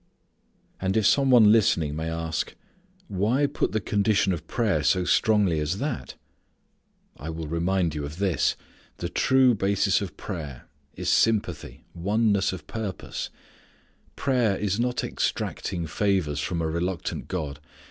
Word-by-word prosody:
And 95 +2 0
if 110 - +2
some 135 +3 +4
one 115 -5 +7
listening 85 -9 +3
may 80 +1 -3
ask: 80 -1 -3 0.5
Why 110 +9 +1
put 140 - -1
the 110 - 0
condition 100 -1 +1
of 80 -1 -6
prayer 105 -10 +1
so 90 +5 +2
strongly 105 -6 +3
as 75 +5 -1
that? 135 0 -4 1.0
I 75 - -7
will 80 -1 -5
remind 85 +1 0
you 75 -1 -4
of 75 +3 -6
this. 95 -3 +1 0.4
The 85 - -4
true 130 +4 +4
basis 100 0 +1
of 95 -6 -6
prayer 75 - -7 0.3
is - - -5
sympathy, 100 -9 +1
oneness 100 +2 +1
of 90 -5 -7
purpose. 110 -2 -5 0.9
Prayer 120 -7 +1
is 100 0 -1
not 125 +1 0
extracting 85 -3 -2
favours 85 -4 0
from 85 +2 -2
a - - 0
reluctant 85 +2 -3
God. 75 -6 -4
95 Hz, 140 wpm, -26 LUFS, 80-110 Hz, 1.0 s, one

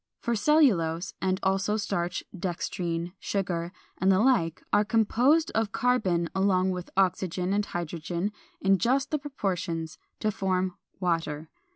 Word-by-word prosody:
For 235 -1 -1
cellulose, 200 - +3
and 185 0 +1
also 195 +2 +1
starch, 180 -4 -2
dextrine, 175 -1 -3
sugar, 175 -3 -2 0.3
and 190 +1 +4
the 185 - +4
like 205 -8 +2
are 205 0 +5
composed 245 +9 +3
of 225 -2 0
carbon 195 -10 +1
along 190 -1 +2
with 180 -1 -5
oxygen 185 -1 +1
and 205 0 0
hydrogen 175 +3 -3 0.3
in 195 0 +3
just 265 +7 +1
the 305 - +1
proportions 180 - -3 0.2
to 215 - +1
form 185 -2 0 0.3
water. 165 -4 -1
190 Hz, 135 wpm, -28 LUFS, 175-215 Hz, 0.3 s, are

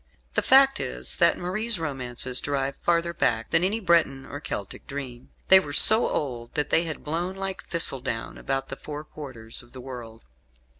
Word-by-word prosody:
The - - +2
fact 270 +1 +5
is - - -4
that - - +4
Marie's 215 +5 -1
romances 130 -5 -1
derive 140 -1 -2
farther 170 0 0
back 115 -7 0
than 165 +1 +4
any 205 +5 0
Breton 165 -8 +2
or 145 - -7
Celtic 100 -9 -6
dream. 130 -3 -7 0.2
They 190 - +9
were 145 -6 -6
so 220 +9 +7
old 120 -5 -4
that 150 -1 -1
they 165 - +3
had 155 -3 -6
blown 170 +5 -2
like 195 0 -4
thistledown 130 -9 -1
about 135 0 -2
the 135 - -5
four 150 0 -7
quarters 125 -8 -7
of 120 - -20
the 130 - -9
world. 120 -3 -9
145 Hz, 180 wpm, -25 LUFS, 130-175 Hz, 0.2 s, They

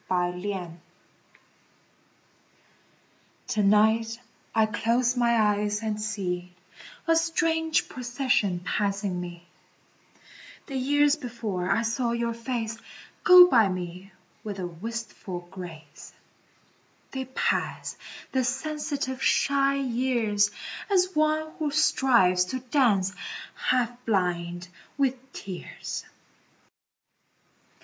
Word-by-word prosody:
The 180 -1 0
Years 195 -3 -3 2.8
To 215 - +1
night 220 +3 +3 0.4
I 220 -1 +5
close 235 +3 +1
my 235 -1 +3
eyes 210 0 +1
and 215 -1 -2
see 180 -4 -3 0.5
A 330 - +5
strange 325 -1 +1
procession 245 -7 0
passing 200 -1 -1
me 175 -1 -8 1.2
The 275 - -7
years 290 +3 +3
before 225 -9 -4
I 210 +4 +2
saw 235 +1 0
your 235 0 -1
face 230 -1 -4 0.4
Go 360 0 +10
by 230 - +4
me 180 +1 -6 0.3
with 205 -2 -5
a 185 - -3
wistful 190 0 -6
grace; 165 -6 -10 1.0
They 265 -1 -4
pass, 260 - -1 0.4
the 260 -1 +1
sensitive, 270 0 -2
shy 275 0 +3
years, 240 -6 +1 0.4
As 370 -2 +3
one 310 0 +1
who 305 -2 0
strives 235 -11 +3
to 255 +8 -4
dance, 235 -8 +2 0.4
half 245 -1 0
blind 175 -3 -1 0.3
with 270 -2 +2 0.2
tears. 190 -8 -7
230 Hz, 95 wpm, -27 LUFS, 190-260 Hz, 2.8 s, Go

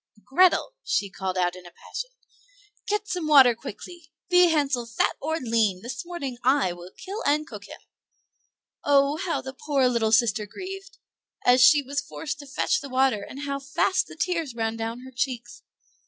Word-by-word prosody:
"Grethel." 365 - +3
she 200 -1 -1
called 190 -1 -4
out 175 -1 +1
in 180 -1 -12
a - - -11
passion, - - -7 0.8
"get 420 0 -1
some 360 -4 -3
water 270 -5 +7
quickly; 305 - -10 0.2
be 360 0 +7
Hansel 280 -7 +1
fat 230 - 0
or 320 +3 -1
lean, 225 - 0
this 240 - -5
morning 285 -8 -6
I 260 -8 +3
will 175 +1 -11
kill 400 +3 -6
and 300 +2 +2
cook - - -10
him." - - -11 1.0
Oh, 280 +1 +3
how 335 +1 -2
the 265 0 -7
poor 275 -1 +1
little 230 -3 +1
sister 220 -2 +3
grieved, 390 - -9 0.5
as 250 +1 +6
she 290 +3 +7
was 280 +2 -2
forced 300 +1 -6
to 285 - -10
fetch 305 +6 0
the 280 - -8
water, 260 -4 +2
and 265 +7 -8
how 280 -1 -3
fast 280 +7 0
the - - -12
tears 330 -9 -1
ran 225 -1 -1
down 225 +2 -4
her 260 +1 -11
cheeks! 245 -2 -3
275 Hz, 180 wpm, -25 LUFS, 230-315 Hz, 1.0 s, water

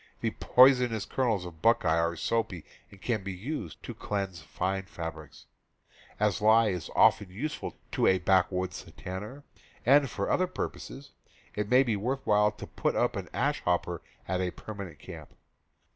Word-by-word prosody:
The - - 0
poisonous 125 -4 +4
kernels 115 -8 0
of 80 -2 -10
buckeye 85 -7 +3
are 85 +1 0
soapy 95 -3 -1 0.2
and 100 - -16
can 110 0 -1
be 100 -1 -4
used 105 - -6
to - - -6
cleanse 95 -5 -4
fine 95 +5 -2
fabrics. 80 -4 -8 0.7
As 105 0 +1
lye 110 +1 +5
is 90 -5 -4
often 105 -2 +5
use 140 +12 -4
ful - - -6
to - - +2
a 95 - +5
backwoods 90 -1 +1
tanner, 105 +10 -7 0.4
and 140 +2 +5
for 100 -2 -2
other 185 - +2
purposes, 140 -5 -6 0.4
it 105 -1 -3
may 125 +2 +6
be 115 -5 0
worth 130 +7 -2
while 105 0 +4
to 105 - -9
put - - -1
up - - +1
an - - -5
ash - - 0
hopper 90 -1 0 0.3
at 95 0 0
a 90 - 0
permanent 100 -4 -8
camp. - - -11
100 Hz, 165 wpm, -29 LUFS, 90-115 Hz, 0.7 s, may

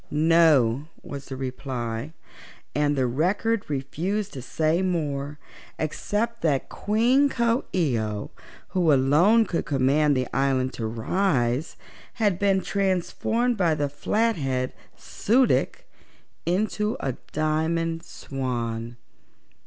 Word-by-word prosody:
"No," 150 -5 +4 0.2
was 140 -1 -7
the 135 - -6
reply, 130 0 -4 0.6
and 145 0 +1
the 130 -2 +1
Record 190 - 0
refused 175 +9 -2
to 130 - -6
say 160 +6 0
more 150 -6 -2 0.4
except 220 +9 -2
that 145 -5 0
Queen 245 +7 +2
Coo 235 0 +1
ee 150 -11 +1
oh, 105 -1 -4 0.4
who 175 -4 +2
alone 155 +12 +4
could 170 - -2
command 140 +1 +2
the 130 -1 -1
island 135 -1 +1
to 115 - -3
rise, 125 - 0 0.4
had 205 -6 +1
been 195 -1 +3
transformed 200 +6 0
by 170 -5 +2
the 145 -1 -1
Flathead 145 - 0 0.2
Su 250 +5 +2
dic - - 0 0.6
into 210 +4 0
a 135 - -1 0.2
Diamond 160 +2 0
Swan. 120 -6 -4
155 Hz, 115 wpm, -25 LUFS, 135-195 Hz, 0.6 s, No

